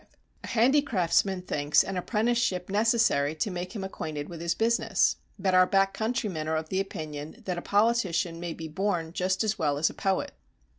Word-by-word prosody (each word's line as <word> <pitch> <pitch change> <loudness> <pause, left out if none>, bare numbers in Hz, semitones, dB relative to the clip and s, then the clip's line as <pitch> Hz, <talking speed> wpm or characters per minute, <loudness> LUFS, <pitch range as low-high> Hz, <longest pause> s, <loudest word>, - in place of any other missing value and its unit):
"A - - -7
handicraftsman 205 - +2
thinks 145 -2 +2
an 195 - -5
apprenticeship 210 -2 0
necessary 210 -9 +2
to 160 +6 -2
make 180 +3 -5
him 200 - -4
acquainted 155 -6 -5
with 170 -2 -8
his 170 0 0
business. 230 +1 +2 0.2
But 190 -1 0
our 185 0 +6
backcountrymen 195 -3 0
are 160 - 0
of 155 0 -4
the 190 - 0
opinion 155 -5 -6
that 180 -2 -2
a - - -8
politician 200 -6 +1
may 170 -1 -4
be 160 - -6
born 170 -1 -2
just 185 +3 0
as 215 -1 -1
well 145 -3 +1
as 155 +2 +2
a - - -13
poet." 190 -1 -1
185 Hz, 180 wpm, -28 LUFS, 160-210 Hz, 0.2 s, our